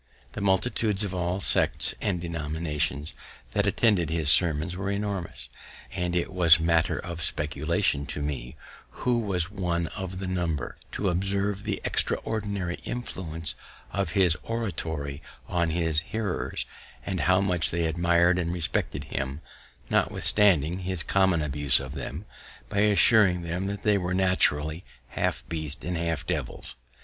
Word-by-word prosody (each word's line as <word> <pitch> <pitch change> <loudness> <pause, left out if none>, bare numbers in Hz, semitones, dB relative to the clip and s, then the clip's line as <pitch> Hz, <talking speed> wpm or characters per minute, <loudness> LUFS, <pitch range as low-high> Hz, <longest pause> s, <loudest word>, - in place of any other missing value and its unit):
The 105 - -6
multitudes 100 +1 +1
of 100 -2 -3
all 90 +1 -1
sects - - +3
and 95 -4 0
denominations 80 -2 -2 0.4
that - - +1
attended 100 -8 +2
his 80 -3 +4
sermons 85 0 +5
were 95 +1 -3
enormous, 100 -3 -3 0.4
and 90 -2 -2
it 90 +2 -1
was 85 -3 +6
matter 80 0 +2
of 85 -1 -6
speculation 75 -1 0
to 75 - -2
me, 65 -3 -4 0.5
who 125 -1 +3
was 95 -5 -1
one 90 -4 -1
of 95 -2 -5
the 95 - -4
number, 85 -7 -2 0.2
to 100 - 0
observe 100 +3 -1
the - - -2
extraordinary 100 -5 -1
influence 85 -9 -4 0.4
of 100 0 -2
his 95 -5 +4
oratory 80 -11 -4 0.3
on 85 -2 0
his 80 -2 +1
hearers, 100 +3 -3 0.4
and 95 -2 -2
how 90 +2 +3
much 90 -5 +1
they 85 0 -1
admir'd 85 +2 +3
and 85 -1 -1
respected 85 -2 -2
him, 70 +3 -4 0.5
notwithstanding 90 -5 +3
his 95 -2 -2
common 95 -5 +2
abuse 75 -1 +3
of - - -7
them, 80 +9 -6 0.4
by 100 - -1
assuring 105 -3 +5
them 95 +4 -3
they 105 -2 +3
were 90 0 -2
naturally 80 -3 +2 0.3
half - - -2
beasts 80 -1 -4
and 90 - -2
half 80 -4 -2
devils. - - -4
90 Hz, 140 wpm, -27 LUFS, 80-95 Hz, 0.5 s, was